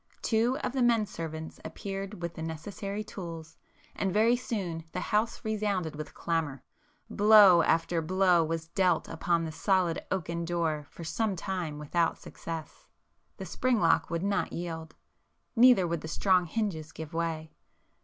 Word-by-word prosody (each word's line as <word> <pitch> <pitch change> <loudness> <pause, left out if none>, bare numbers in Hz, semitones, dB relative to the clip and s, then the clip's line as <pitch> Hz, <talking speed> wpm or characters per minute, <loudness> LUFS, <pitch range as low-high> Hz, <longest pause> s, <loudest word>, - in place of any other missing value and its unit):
Two 235 +3 +2
of 250 - -2
the 265 - 0
men 235 -3 +4
servants 160 -4 -7
appeared 195 -1 -6
with 170 0 -3
the 160 - -8
necessary 195 +6 -5
tools, 165 -6 -8 0.4
and 195 - -1
very 220 +5 +4
soon 190 -9 -3
the - - -2
house 220 +2 -1
resounded 205 -7 -1
with 155 0 -7
clamour,—blow 200 - +3
after 165 +1 +1
blow 180 0 +3
was 160 0 -3
dealt 185 0 +2
upon 170 -1 0
the 160 - -4
solid 180 0 +1
oaken 170 -2 -2
door 165 -4 -1
for 170 - -10
some 195 +6 -1
time 175 -4 -3
without 165 +3 0
success,—the 165 -2 -10
spring 255 -3 +1
lock 165 -3 +3
would 170 +1 -2
not 200 0 0
yield,—neither 175 +7 0
would 170 -2 -2
the - - -6
strong 180 +2 +2
hinges 160 -6 -2
give 160 -1 -8
way. 165 -1 -2
175 Hz, 145 wpm, -29 LUFS, 160-205 Hz, 0.4 s, men